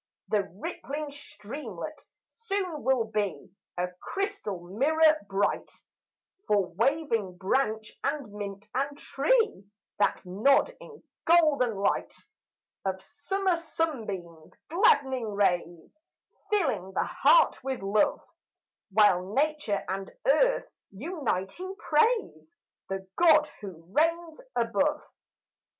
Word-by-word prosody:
The 205 Hz, -2 st, +1 dB
rippling 290 Hz, +8 st, -5 dB
streamlet 280 Hz, -, -8 dB, 0.2 s
soon 390 Hz, -8 st, -3 dB
will 260 Hz, -3 st, +2 dB
be 205 Hz, -9 st, -3 dB, 0.3 s
A 180 Hz, +1 st, 0 dB
crystal 395 Hz, -, -3 dB
mirror 305 Hz, -, +3 dB
bright 195 Hz, +1 st, 0 dB, 0.8 s
For 195 Hz, -4 st, +1 dB
waving 230 Hz, -, 0 dB
branch 220 Hz, +2 st, 0 dB
and 280 Hz, -7 st, -2 dB
mint 200 Hz, -1 st, -6 dB
and 280 Hz, +2 st, -1 dB
tree 445 Hz, -, +1 dB, 0.3 s
That 205 Hz, -, +1 dB
nod 275 Hz, -, +3 dB
in 450 Hz, -2 st, -13 dB, 0.2 s
golden 305 Hz, -9 st, +4 dB
light 195 Hz, 0 st, 0 dB, 0.7 s
Of 190 Hz, -1 st, -2 dB
summer 360 Hz, -, -1 dB
sunbeams 220 Hz, -, -4 dB, 0.2 s
glad'ning 270 Hz, -, +3 dB
rays 175 Hz, -, -1 dB, 0.5 s
Filling 260 Hz, -, 0 dB
the -, -, +1 dB
heart -, -, +4 dB
with 265 Hz, -5 st, -3 dB
love, 205 Hz, +2 st, +2 dB, 0.7 s
While 195 Hz, -1 st, +3 dB
nature 295 Hz, -8 st, 0 dB
and 195 Hz, +1 st, -4 dB
earth, -, -, +3 dB, 0.2 s
uniting, 290 Hz, -, -3 dB
praise 415 Hz, -1 st, +1 dB, 0.3 s
The 190 Hz, 0 st, -4 dB
God 310 Hz, -3 st, +5 dB
who 185 Hz, -5 st, -9 dB
reigns 330 Hz, +1 st, +1 dB, 0.2 s
above. -, -, +1 dB
265 Hz, 100 wpm, -28 LUFS, 195-320 Hz, 0.8 s, God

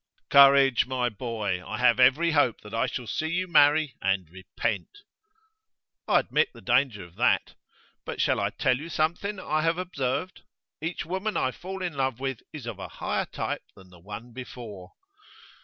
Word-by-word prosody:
'Courage, 140 Hz, -3 st, +7 dB
my 125 Hz, -2 st, 0 dB
boy! 105 Hz, -5 st, -3 dB
I -, -, -5 dB
have 125 Hz, -1 st, +4 dB
every 140 Hz, +7 st, +5 dB
hope 145 Hz, -7 st, +2 dB
that 105 Hz, -, -12 dB
I 115 Hz, -, +1 dB
shall 125 Hz, -, -5 dB
see 155 Hz, +7 st, -2 dB
you 180 Hz, +3 st, -1 dB
marry 150 Hz, -2 st, +4 dB
and 95 Hz, -3 st, 0 dB
repent.' 105 Hz, -, -4 dB, 1.0 s
'I -, -, +4 dB
admit -, -, +1 dB
the -, -, -11 dB
danger 120 Hz, -8 st, +1 dB
of 85 Hz, 0 st, -15 dB
that. -, -, +2 dB, 0.5 s
But -, -, -6 dB
shall -, -, +2 dB
I -, -, +1 dB
tell 125 Hz, -, +1 dB
you 160 Hz, +3 st, -7 dB
something 175 Hz, +6 st, -1 dB
I 155 Hz, -3 st, 0 dB
have 165 Hz, +1 st, +1 dB
observed? 180 Hz, -1 st, -3 dB, 0.4 s
Each 165 Hz, +2 st, -3 dB
woman 190 Hz, +5 st, -2 dB
I 130 Hz, -, +1 dB
fall 190 Hz, +6 st, -7 dB
in 175 Hz, -3 st, -2 dB
love 130 Hz, -3 st, -1 dB
with 135 Hz, -3 st, -3 dB
is 150 Hz, -6 st, -8 dB
of 120 Hz, -, -6 dB
a -, -, -5 dB
higher -, -, -2 dB
type -, -, -3 dB
than 95 Hz, -1 st, -17 dB
the 90 Hz, -, -16 dB
one 105 Hz, +6 st, -9 dB
before. 115 Hz, -7 st, -9 dB
130 Hz, 175 wpm, -27 LUFS, 115-160 Hz, 1.0 s, Courage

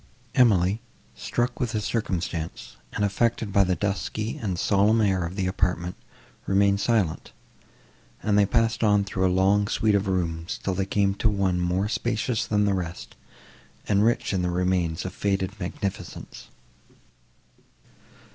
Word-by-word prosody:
Emily, 105 Hz, -4 st, +3 dB, 0.3 s
struck 120 Hz, +6 st, -2 dB
with 120 Hz, -5 st, -1 dB
the 110 Hz, -, 0 dB
circumstance, 90 Hz, -7 st, -3 dB, 0.2 s
and 105 Hz, -, 0 dB
affected 110 Hz, 0 st, 0 dB
by 100 Hz, -, +5 dB
the 90 Hz, -1 st, +1 dB
dusky 105 Hz, +3 st, -2 dB
and 95 Hz, -5 st, -3 dB
solemn 105 Hz, +5 st, +3 dB
air 95 Hz, -4 st, +2 dB
of 85 Hz, +2 st, -5 dB
the 95 Hz, -2 st, -1 dB
apartment, 90 Hz, -1 st, -1 dB, 0.5 s
remained 100 Hz, 0 st, +3 dB
silent, 100 Hz, -8 st, 0 dB, 0.9 s
and 105 Hz, -, +2 dB
they 100 Hz, -1 st, +4 dB
passed 115 Hz, +2 st, +1 dB
on 105 Hz, -2 st, +4 dB
through 95 Hz, -1 st, 0 dB
a -, -, +2 dB
long 100 Hz, +2 st, +3 dB
suite 110 Hz, 0 st, +1 dB
of 100 Hz, 0 st, +1 dB
rooms, 85 Hz, -3 st, -2 dB
till 95 Hz, -, 0 dB
they 95 Hz, +1 st, -1 dB
came 100 Hz, -1 st, +2 dB
to 110 Hz, +3 st, +1 dB
one 95 Hz, -3 st, 0 dB
more 90 Hz, +3 st, 0 dB
spacious 115 Hz, +1 st, -1 dB
than 105 Hz, -1 st, +2 dB
the 100 Hz, -, +2 dB
rest, 90 Hz, -2 st, -5 dB, 0.7 s
and 100 Hz, 0 st, +3 dB
rich 115 Hz, -2 st, +1 dB
in 95 Hz, -, +1 dB
the 90 Hz, -, 0 dB
remains 90 Hz, -2 st, 0 dB
of 95 Hz, -, -4 dB
faded 95 Hz, -1 st, -1 dB
magnificence. 95 Hz, +2 st, -6 dB
100 Hz, 150 wpm, -25 LUFS, 90-105 Hz, 0.9 s, by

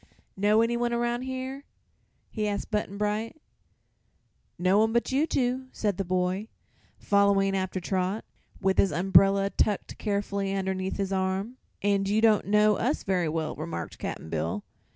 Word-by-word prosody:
"Know 210 Hz, +3 st, +3 dB
anyone 235 Hz, +1 st, 0 dB
around 240 Hz, 0 st, 0 dB
here?" 260 Hz, +1 st, -5 dB, 0.7 s
he 215 Hz, -2 st, -1 dB
asked 205 Hz, -1 st, -3 dB
Button 210 Hz, -2 st, -2 dB
Bright. 210 Hz, +6 st, -2 dB, 1.2 s
"No 185 Hz, +3 st, +3 dB
one 220 Hz, +1 st, +3 dB
but 235 Hz, +2 st, +1 dB
you 285 Hz, +5 st, +2 dB
two," 255 Hz, -1 st, 0 dB
said 205 Hz, -4 st, -1 dB
the 195 Hz, -, -1 dB
boy, 185 Hz, +3 st, -1 dB, 0.5 s
following 200 Hz, -1 st, +3 dB
after 185 Hz, 0 st, -2 dB
Trot, 185 Hz, +3 st, -2 dB, 0.3 s
with 190 Hz, -1 st, +1 dB
his 195 Hz, -, +4 dB
umbrella 195 Hz, +4 st, +4 dB
tucked 205 Hz, -2 st, -1 dB
carefully 200 Hz, -1 st, -1 dB
underneath 190 Hz, -1 st, -2 dB
his 195 Hz, -1 st, -2 dB
arm. 190 Hz, +5 st, -1 dB, 0.3 s
"And 200 Hz, -1 st, +1 dB
you 210 Hz, +2 st, +2 dB
don't 220 Hz, -2 st, +4 dB
know 210 Hz, 0 st, +4 dB
us 260 Hz, +6 st, -1 dB
very 180 Hz, -4 st, 0 dB
well," 160 Hz, 0 st, -2 dB
remarked 150 Hz, -, -6 dB
Cap'n 80 Hz, -, -5 dB
Bill. 80 Hz, +1 st, -2 dB
200 Hz, 150 wpm, -27 LUFS, 190-220 Hz, 1.2 s, his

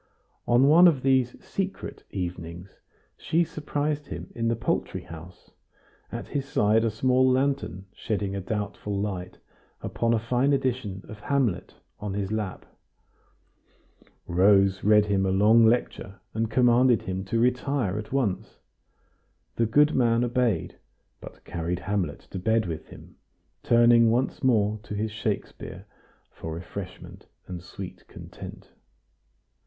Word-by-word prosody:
On 120 Hz, +3 st, +5 dB
one 170 Hz, +5 st, +8 dB
of 145 Hz, -7 st, +2 dB
these 130 Hz, -2 st, +2 dB
"secret" 195 Hz, 0 st, -4 dB
evenings 90 Hz, 0 st, -6 dB, 0.4 s
she 170 Hz, +2 st, +1 dB
surprised 150 Hz, -2 st, -3 dB
him -, -, -7 dB
in 115 Hz, -1 st, -1 dB
the 115 Hz, -, +1 dB
poultry 115 Hz, -, -2 dB
house, 85 Hz, +2 st, -12 dB, 0.6 s
at -, -, -6 dB
his 140 Hz, -2 st, -2 dB
side 110 Hz, -3 st, +3 dB
a 115 Hz, -, +2 dB
small 130 Hz, +4 st, +3 dB
lantern 130 Hz, -7 st, 0 dB
shedding 100 Hz, -2 st, -3 dB
a 100 Hz, -, -3 dB
doubtful 100 Hz, 0 st, -3 dB
light 95 Hz, -3 st, -4 dB, 0.4 s
upon 115 Hz, 0 st, -1 dB
a -, -, +2 dB
fine 125 Hz, +5 st, +1 dB
edition 120 Hz, -8 st, -1 dB
of 110 Hz, -, -10 dB
"Hamlet" 120 Hz, -9 st, -1 dB, 0.2 s
on 105 Hz, -2 st, -4 dB
his 100 Hz, -1 st, -2 dB
lap. 105 Hz, -4 st, -3 dB, 1.6 s
Rose 95 Hz, +1 st, +4 dB
read 105 Hz, 0 st, +5 dB
him 100 Hz, -2 st, +1 dB
a 95 Hz, -, +1 dB
long 110 Hz, +4 st, +5 dB
lecture, 110 Hz, -4 st, -1 dB
and 110 Hz, 0 st, -1 dB
commanded 125 Hz, 0 st, +4 dB
him 95 Hz, +1 st, -3 dB
to 115 Hz, -, -1 dB
retire 125 Hz, -4 st, +1 dB
at 105 Hz, -, -8 dB
once. 125 Hz, -9 st, -1 dB, 1.0 s
The 115 Hz, -, +1 dB
good 150 Hz, +6 st, +4 dB
man 120 Hz, -2 st, +3 dB
obeyed, 120 Hz, -7 st, 0 dB, 0.4 s
but -, -, -13 dB
carried 85 Hz, +1 st, -3 dB
"Hamlet" 95 Hz, -6 st, -2 dB
to -, -, -4 dB
bed 110 Hz, +3 st, +1 dB
with 80 Hz, -3 st, -5 dB
him, -, -, -14 dB, 0.4 s
turning 120 Hz, -1 st, +5 dB
once 125 Hz, +5 st, 0 dB
more 110 Hz, -4 st, +2 dB
to 105 Hz, -2 st, -7 dB
his 110 Hz, +1 st, -2 dB
Shakespeare 105 Hz, -1 st, -4 dB, 0.5 s
for 80 Hz, 0 st, -7 dB
refreshment 90 Hz, +2 st, -9 dB, 0.2 s
and 90 Hz, -2 st, -7 dB
sweet 90 Hz, +1 st, -9 dB
content. -, -, -11 dB
110 Hz, 135 wpm, -26 LUFS, 95-125 Hz, 1.6 s, one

